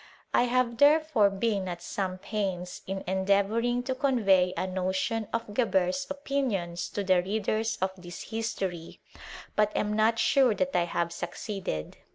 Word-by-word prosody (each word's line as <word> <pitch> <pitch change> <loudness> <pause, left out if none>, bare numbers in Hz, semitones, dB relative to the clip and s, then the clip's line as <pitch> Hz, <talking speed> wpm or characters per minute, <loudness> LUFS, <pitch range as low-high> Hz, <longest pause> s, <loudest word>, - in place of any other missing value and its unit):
I 245 - +4
have, 245 -1 +1
therefore, 290 -6 +5
been 195 -1 -1
at 175 -1 -5
some 185 -2 -3
pains 185 -3 -3
in 195 0 -3
endeavouring 200 +6 +1
to 260 - -1
convey 210 -10 +3
a - - 0
notion 190 +4 -1
of 225 -2 -3
Geber*s 195 +2 +1
opinions 255 -12 -2
to 205 - -3
the 185 -2 +4
readers 220 +3 -1
of 190 - +1
this 175 -2 -10
history; 190 -7 -3 0.6
but 210 0 +3
am 210 0 0
not 220 +1 +3
sure 255 -1 +4
that 275 +3 -1
I 175 - +3
have 170 0 -2
succeeded. 180 - -5
205 Hz, 150 wpm, -28 LUFS, 185-235 Hz, 0.6 s, therefore